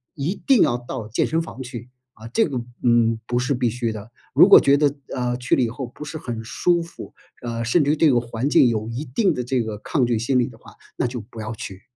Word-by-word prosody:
一 150 +7 -2
定 265 -5 +5
要 120 - +3
到 120 -2 -7
健 115 - 0
身 165 +1 0
房 160 -5 -8
去， 120 -1 -8 0.2
啊， 110 +1 -11
这 225 - +2
个， 130 -6 -3 0.2
嗯， 115 -2 +3
不 120 - -1
是 125 +3 0
必 125 -2 0
须 120 0 -2
的。 110 0 -8 0.2
如 - - +7
果 - - +10
觉 140 0 +4
得， 145 -1 +2 0.2
呃， 125 -1 -1
去 125 0 0
了 - - +2
以 120 - +1
后 130 +3 -5
不 140 +5 -10
是 155 +2 -6
很 120 -6 -5
舒 170 +9 +1
服， 170 0 -10 0.3
呃， 115 -1 -4
甚 150 +7 +3
至 145 - +2
于 - - +2
对 160 0 +5
环 120 +2 -1
境 130 - +5
有 110 -1 -2
一 120 +5 -4
定 165 - +1
的 125 - -3
这 125 +1 0
个 110 -2 -4
抗 130 +4 0
拒 120 -1 0
心 125 +4 +1
理 120 - +1
的 115 - -12
话， - - -16 0.2
那 - - -1
就 120 0 -3
不 110 +1 -10
要 110 0 -5
去。 95 -3 -8
125 Hz, 275 characters per minute, -22 LUFS, 115-140 Hz, 0.3 s, 果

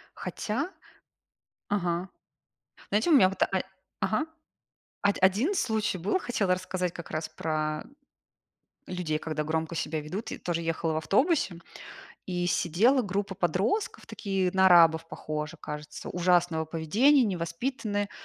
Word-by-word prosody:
Хотя, 270 +11 -3 1.0
ага, 180 -2 -1 0.8
знаете, 215 +10 +2
у - - +6
меня 220 -10 +7
вот 195 - -8
а, - - 0 0.5
ага 215 +8 +1 0.8
од 200 0 +3
один 205 - +3
случай 220 - 0
был, 200 - +1
хотела 200 - +1
рассказать 185 -1 -3
как 170 - -9
раз 155 0 -3
про 155 -1 -2 1.0
людей, 180 -4 -2
когда 155 -1 -3
громко 160 +1 -2
себя 155 -1 -2
ведут. 190 +10 -5 0.2
Тоже 175 -1 -1
ехала 165 0 -1
в - - -1
автобусе, 235 - +2 0.7
и 175 -1 -1
сидела 195 - +3
группа 200 -2 -2
подростков, 195 - 0
такие 195 -3 -1
на 190 0 +5
арабов 165 -2 +6
похожи, 150 -1 -5
кажется, 150 0 -7
ужасного 175 -2 +2
поведения, 220 - +4
невоспитанные. 205 +3 -2
180 Hz, 125 wpm, -28 LUFS, 165-205 Hz, 1.0 s, меня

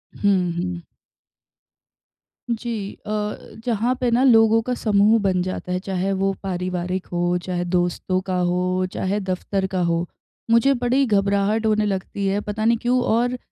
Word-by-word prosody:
हुँ, 185 -4 +2
हुँ। 180 -1 -3 1.7
जी 225 -3 -3
अ, - - -7 0.6
जहाँ 235 +1 +1
पे 245 - +2
ना 245 +3 +3
लोगों 225 -3 +5
का 250 - +1
समूह 215 -1 +3
बन 185 -2 +1
जाता 185 -1 -5
है, 180 - 0
चाहे 190 0 -2
वो 195 0 0
पारिवारिक 180 0 -3
हो, 175 0 +1
चाहे 175 -1 -2
दोस्तों 175 +1 0
का 185 - -1
हो, 180 +1 0
चाहे 200 +2 -1
दफ्तर 190 0 -2
का 185 - +1
हो, 170 0 0 0.4
मुझे 265 +4 +5
बड़ी 250 +2 +1
घबराहट 200 +1 +1
होने 215 -1 +2
लगती 195 0 -2
है, 200 +1 +1
पता 215 +1 -3
नहीं 230 0 +4
क्यों। 250 +1 +2
और 245 +2 +1
195 Hz, 155 wpm, -22 LUFS, 185-225 Hz, 1.7 s, लोगों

